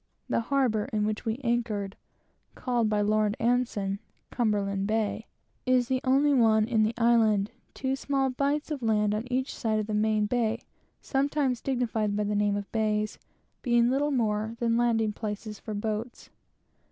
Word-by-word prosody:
The - - +2
harbor 230 -3 +1
in 210 -1 -1
which 215 0 -3
we 225 +2 -1
anchored 230 -5 -1 0.6
(called 240 -4 0
by 210 -1 +1
Lord 210 0 +1
Anson, 225 -5 0 0.3
Cumberland 200 -4 0
bay) 220 0 -1 0.4
is 250 -1 +3
the 260 -1 +1
only 275 +3 +3
one 220 -4 +4
in 230 -3 +2
the 215 +2 +1
island; 225 -4 +3 0.2
two 265 0 -1
small 270 -1 0
bights 285 +4 -1
of 290 -3 -3
land 210 -2 +2
on 225 +4 -4
each 260 +1 -1
side 220 -2 -1
of 215 - -1
the 215 - -4
main 215 0 +2
bay 230 0 0 0.4
(sometimes 275 -2 0
dignified 230 -5 -1
by 210 - 0
the 210 0 -1
name 205 0 +1
of 205 -1 -5
bays) 215 -1 0 0.4
being 240 -1 +3
little 285 +3 +1
more 220 -4 0
than 230 -1 +1
landing 225 -2 +2
places 210 0 -5
for 215 - -6
boats. 215 +3 -4
225 Hz, 165 wpm, -28 LUFS, 210-250 Hz, 0.6 s, one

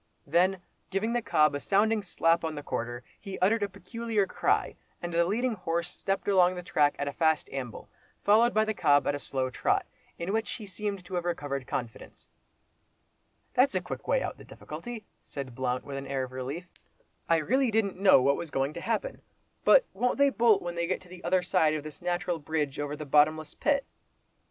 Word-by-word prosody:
Then 180 +5 +2 0.3
giving 200 +5 -1
the 240 - +1
cob 150 -8 +3
a 145 - -2
sounding 210 +6 +2
slap 165 -3 +1
on 160 -1 -2
the 145 - -6
quarter, 120 -2 -4 0.2
he 195 -2 -7
uttered 210 +4 +2
a 205 - 0
peculiar 220 +1 -2
cry, - - 0 0.2
and 175 0 -5
the 170 0 +3
leading 235 +7 0
horse 170 -3 -2
stepped 195 0 -3
along 185 -2 +4
the 180 - -6
track 145 -4 +2
at 145 - -2
a 140 - -3
fast 160 -2 +2
amble, 130 -4 -6 0.4
followed 225 +4 +5
by 215 -1 +2
the 220 - -1
cob 145 -7 +3
at - - +1
a 145 - -3
slow 130 -2 -2
trot, - - +1 0.3
in 175 +4 -3
which 220 -1 -1
he 215 - -7
seemed 200 -1 -4
to 190 - -10
have 175 -1 0
recovered 145 -7 -3
confidence. 120 -3 -6 1.3
"That's 265 +2 +3
a - - +3
quick - - -7
way - - +2
out - - -2
of - - -17
the - - -11
difficulty," 240 -3 -8 0.2
said 135 -3 -7
Blount, 125 0 -2
with 140 -1 -5
an 135 0 -6
air 135 -1 -1
of 130 - -7
relief. 130 +7 -5 0.6
"I 165 - +5
really 255 - +2
didn't 205 -4 0
know 190 -9 +6
what 140 +1 +3
was 170 - -5
going 135 +1 -1
to 170 - -6
happen. - - -2 0.4
But - - +6
won't 250 - 0
they 280 0 +4
bolt 230 -6 +4
when 175 0 -3
they 170 0 -1
get 185 - -1
to 180 - -17
the 180 0 -12
other 185 -1 +2
side 155 -3 +2
of 150 - -4
this 155 +2 -10
natural 175 -1 -1
bridge 150 -2 -2
over 145 0 -2
the 150 - -7
bottomless 150 +2 +3
pit?" 285 -2 +1
175 Hz, 210 wpm, -29 LUFS, 145-205 Hz, 1.3 s, know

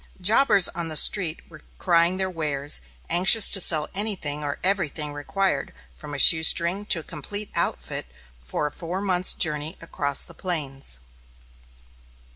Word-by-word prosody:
Jobbers 200 0 +4
on 170 -1 -5
the 155 - -4
street 170 0 +3
were 155 -2 -16 0.2
crying 170 +1 +1
their 190 0 -1
wares, 150 -5 0 0.3
anxious 190 +5 +5
to 195 - +5
sell 155 -3 +2
anything 185 -8 -3
or 145 -1 -4
everything 165 -6 -2
required, 190 +7 -2 0.2
from 145 -1 -9
a - - -5
shoestring 170 +6 +4
to 170 - +2
a - - -18
complete 205 +5 -7
outfit - - -3 0.3
for 65 - 0
a 150 - -4
four 175 +4 -6
months' 185 -2 +1
journey 155 +1 -1
across 145 -4 -2
the - - -12
plains. 140 - -4
170 Hz, 145 wpm, -23 LUFS, 150-190 Hz, 0.3 s, anxious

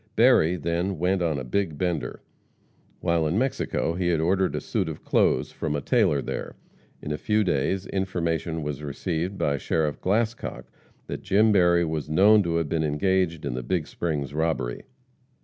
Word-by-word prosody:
Berry 110 -8 +5
then 85 +3 -2
"went 90 +3 +1
on 80 -4 0
a 65 - -4
big 80 +4 -1
bender." 85 -1 -2 0.8
While 85 -2 +1
in 85 +6 0
Mexico 125 -8 0
he 90 +1 -1
had 85 -3 +2
ordered 95 +3 +1
a - - -1
suit - - -2
of - - -8
clothes - - +2
from 75 - -3
a 70 - -2
tailor 70 -2 +2
there. - - -5 0.5
In 75 - -4
a 75 - -2
few 105 +4 +1
days, 90 +3 0
information 85 -4 -2
was 75 0 -4
received 85 +6 -3
by 70 -5 0
Sheriff 75 0 -1
Glascock 110 - -1 0.4
that - - -6
Jim 105 +3 +3
Berry 85 -3 +4
was 80 -2 -3
known 105 +7 +6
to 85 -3 -1
have 85 -2 0
been 80 +1 0
engaged 85 +2 0
in - - -2
the 65 - -3
Big 80 +5 -1
Springs 75 -4 -3
robbery. 80 -6 -1
85 Hz, 175 wpm, -25 LUFS, 75-95 Hz, 0.8 s, known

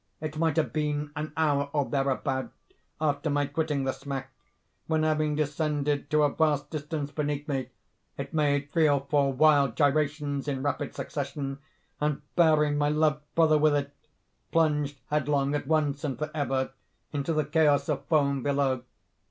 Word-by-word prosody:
It 155 0 -5
might 160 -1 +1
have 160 - +1
been 150 -1 -1
an 150 +1 -4
hour, 145 -3 +2
or 145 -2 +1
thereabout, 135 -1 -1 0.5
after 150 0 0
my 145 0 +1
quitting 145 -1 -1
the 135 - 0
smack, 135 -1 -6 0.6
when, 160 -1 +1
having 155 -1 +1
descended 150 -1 -1
to 150 +1 +3
a 145 - +2
vast 150 -3 +1
distance 150 -1 -4
beneath 145 -1 -2
me, 135 -3 -2 0.5
it - - -6
made 145 -2 +1
three 160 -1 +4
or 140 -1 +1
four 140 -2 +3
wild 140 -3 +4
gyrations 145 0 +1
in 135 -2 -2
rapid 145 -1 -2
succession, 140 -1 -4 0.4
and, 150 -1 -1
bearing 150 -3 +4
my 145 0 +2
loved 150 0 +2
brother 155 -2 +5
with 150 -1 +4
it, 140 0 -2 0.6
plunged 150 -3 +1
headlong, 145 -1 +1
at 145 -2 -2
once 150 -2 +1
and 140 -4 -2
forever, 145 -4 -2 0.4
into 145 +2 -1
the 155 -2 +1
chaos 145 -2 +3
of 140 -3 -1
foam 140 -3 +2
below. 140 -2 +1
145 Hz, 160 wpm, -28 LUFS, 140-155 Hz, 0.6 s, brother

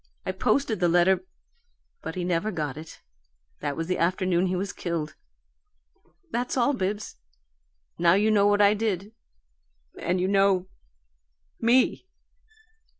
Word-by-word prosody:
I - - -1
posted 220 +4 0
the 175 -1 +2
letter, 175 +2 +3 0.8
but 160 - -6
he 180 - -3
never 180 +4 0
got 150 -7 -3
it. 155 +1 -11 0.6
That 145 -1 -3
was 165 - -2
the 180 +2 -2
afternoon 185 +1 +1
he 185 - -1
was 190 +1 -3
killed. 165 -3 -4 1.2
That's 245 +3 -2
all, 255 +3 +3
Bibbs. 205 - -3 0.8
Now 170 0 +5
you 210 +3 +3
know 205 -1 +4
what 205 0 +4
I 200 +1 +6
did 210 -1 -2 0.9
and 180 +1 -1
you 185 - +1
know 195 -2 +3 0.9
ME!" 240 +3 +2
185 Hz, 135 wpm, -26 LUFS, 175-210 Hz, 1.2 s, I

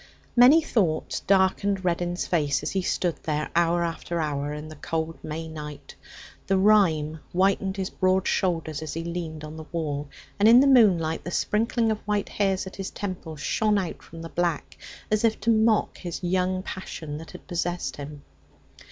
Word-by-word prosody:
Many 265 +7 +7
thoughts 180 - 0
darkened 190 0 +2
Reddin's 175 0 -1
face 150 -5 0
as 150 - -2
he 190 - 0
stood 175 -1 -1
there 150 -1 -2
hour 170 0 +3
after 170 0 -3
hour 145 -2 -2
in 150 +1 -6
the 155 - -10
cold 160 +2 -3
May 160 +1 -5
night. 150 -2 -8 0.5
The 195 - +3
rime 170 -7 +3
whitened 190 +1 +1
his 190 -1 -3
broad 185 0 +1
shoulders 165 -5 0
as 155 -1 -5
he 165 - -3
leaned 165 -2 -5
on 155 +1 -8
the 160 - -8
wall, 150 -4 -3 0.3
and 210 +2 +6
in 235 +2 +9
the 275 - +5
moonlight 190 - +4
the - - -5
sprinkling 225 +4 +1
of 215 - -2
white 210 -1 -2
hairs 195 -2 0
at 190 - -9
his 195 -1 -4
temples 180 -6 -6
shone 215 +6 +1
out 185 -4 -3
from 165 0 -11
the 165 - -7
black 170 -3 -2 0.4
as 215 +1 +2
if 225 -1 +2
to 230 - +3
mock 220 -1 +2
this 175 0 -5
young 185 +1 0
passion 160 -6 -6
that 165 - -10
had 180 - -12
possessed 175 0 -3
him. 145 0 -8
175 Hz, 180 wpm, -26 LUFS, 160-195 Hz, 0.5 s, in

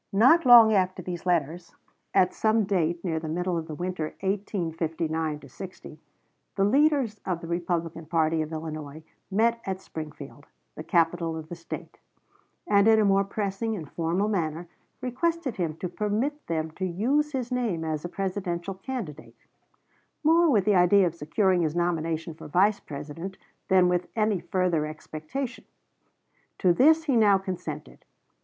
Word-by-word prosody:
Not 260 +9 +5
long 230 -3 +9
after 185 -2 +1
these 175 0 -6
letters, 170 0 -1 0.4
at 185 -2 +3
some 220 0 +2
date 175 -3 0
near 160 -3 0
the 160 - -6
middle 180 +2 -1
of 165 -1 -3
the 155 - -6
winter 175 -1 -4
1859 165 -6 -2
60, 155 +1 -10 0.6
the 195 - +2
leaders 265 -1 +2
of 180 -3 -2
the 170 - -8
Republican 170 -1 -2
party 160 -1 +1
of 155 0 -4
Illinois 155 -1 -6 0.3
met 230 +4 +2
at 190 -1 -3
Springfield, 150 -4 -9 0.3
the - - -8
capital 165 0 +1
of 160 0 -8
the 175 - -5
State, 170 0 -8 0.7
and 200 0 +4
in 220 -1 +6
a 215 - +4
more 195 0 +4
pressing 200 +2 -2
and 160 -7 -8
formal 170 +5 0
manner 170 -4 -2 0.3
requested 275 +2 -1
him 165 -4 -2
to 180 - -3
permit 215 - -2
them 160 -1 -2
to 185 +4 -4
use 270 - 0
his 255 -2 -3
name 230 -10 -1
as 155 -1 -3
a 175 - -4
Presidential 190 -1 -3
candidate, 190 - -7 0.9
more 330 +2 +5
with 210 -9 +3
the 210 - +4
idea 185 +1 +5
of 170 - -1
securing 175 +4 +1
his 155 -1 -1
nomination 165 -2 -1
for 155 - -11
Vice 200 +6 +3
President 155 +6 -7 0.3
than 185 -2 +5
with 180 0 0
any 215 -3 +1
further 175 -3 0
expectation. 155 - -6 0.9
To 180 -3 +3
this 315 - +5
he 280 -5 +1
now 210 -4 +5
consented. 180 -6 -6
180 Hz, 155 wpm, -26 LUFS, 160-210 Hz, 0.9 s, long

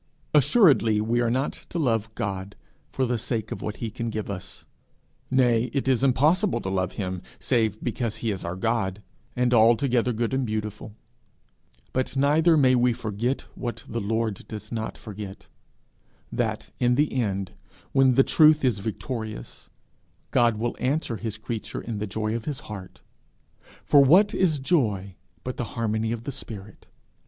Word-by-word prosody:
Assuredly 145 - +5
we 115 +3 +1
are 120 - +2
not 130 +4 0 0.2
to - - -4
love 115 -8 +1
God 100 0 -4 0.4
for 130 - 0
the 120 -1 -1
sake 110 -1 -3
of - - -5
what 105 - -4
he 115 -2 -4
can 115 0 -3
give 110 -2 -4
us; 95 0 -7 0.6
nay, 125 -3 +3
it 140 -2 -1
is 130 -1 +2
impossible 155 - +3
to 95 - -3
love 95 -1 -1
him 95 -3 -4 0.2
save 110 -4 0
because 120 -2 -2
he 115 - -1
is 95 - -4
our 85 +1 -3
God, 105 -1 -1 0.3
and 125 0 +2
altogether 120 +2 +4
good 115 +1 -1
and 135 0 +1
beautiful; 105 -1 -4 1.0
but 130 +1 -1
neither 155 +4 +4
may 130 -3 +5
we 125 -1 +3
forget 115 +4 -2
what 120 -1 -5
the 115 +1 -3
Lord 110 0 -2
does 110 -1 -8
not 110 -1 -4
forget, 105 -2 -8 0.9
that, - - -2
in 125 0 +3
the 150 +3 +1
end, 100 -7 -1 0.4
when 135 -2 +4
the 135 - +6
truth 155 -1 +5
is 120 -6 +2
victorious, 110 - -6 0.6
God 120 -2 +3
will 120 +2 -2
answer 130 -2 0
his 110 -2 -5
creature 110 +1 -5
in 110 -3 -5
the 105 - -2
joy 110 +2 -2
of 115 -1 -4
his 145 -3 -4
heart. 100 -4 -9 0.8
For 140 -1 +6
what 185 +10 +5
is 170 -5 +2
joy 110 - 0 0.3
but 130 - -5
the - - -1
harmony 110 0 0
of 115 -1 -4
the 140 - -4
spirit! 105 -6 -9
115 Hz, 165 wpm, -25 LUFS, 105-130 Hz, 1.0 s, the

